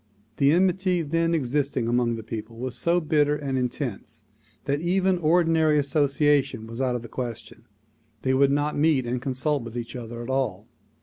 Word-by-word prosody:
The 140 0 +4
enmity 185 0 +2
then 165 +2 +1
existing 140 -3 0
among 120 0 +1
the 115 - -7
people 110 +1 -7
was 125 0 -4
so 170 +8 +2
bitter 150 -2 +2
and 140 -2 -3
intense 125 -1 -4 0.4
that 145 +1 -1
even 185 +1 +1
ordinary 160 -2 +3
association 140 -3 +1
was 115 +3 -6
out 125 -2 +1
of 120 - -4
the - - -8
question. 120 -1 -7 0.6
They 130 - +1
would 135 +1 +4
not 145 +1 0
meet 145 -4 +2
and 120 +1 -2
consult 135 +2 -1
with 115 0 -7
each 120 +1 -6
other 120 -1 -6
at 120 - -8
all. 115 -6 -2
140 Hz, 175 wpm, -25 LUFS, 120-155 Hz, 0.6 s, The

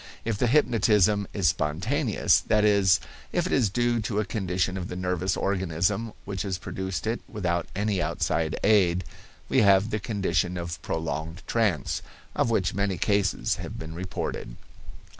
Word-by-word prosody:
If 110 -3 -1
the 125 - +2
hypnotism 105 -6 +3
is 95 -6 +2
spontaneous, 95 - +1
that 105 0 +3
is, 100 -3 +4 0.3
if 175 - 0
it 185 - -2
is 120 -6 +3
due 120 +2 +1
to 105 -1 -1
a 105 - 0
condition 95 -2 -1
of 90 -2 -4
the - - -6
nervous 90 0 -1
organism 95 +3 0
which 95 -2 -4
has 95 -3 -2
produced 95 +2 -4
it 115 +2 -1
without 85 -5 -1
any 100 -2 0
outside 80 0 -1
aid, 95 -4 +4 0.4
we 130 - +3
have 100 +1 +4
the 105 - 0
condition 95 -4 -1
of 85 -1 -5
prolonged 80 +2 -4
trance, 105 -10 0 0.3
of - - +1
which 95 -6 +1
many 100 -1 0
cases 100 +1 +1
have - - -7
been 80 0 -7
reported. 85 -7 -5
95 Hz, 160 wpm, -26 LUFS, 90-105 Hz, 0.4 s, is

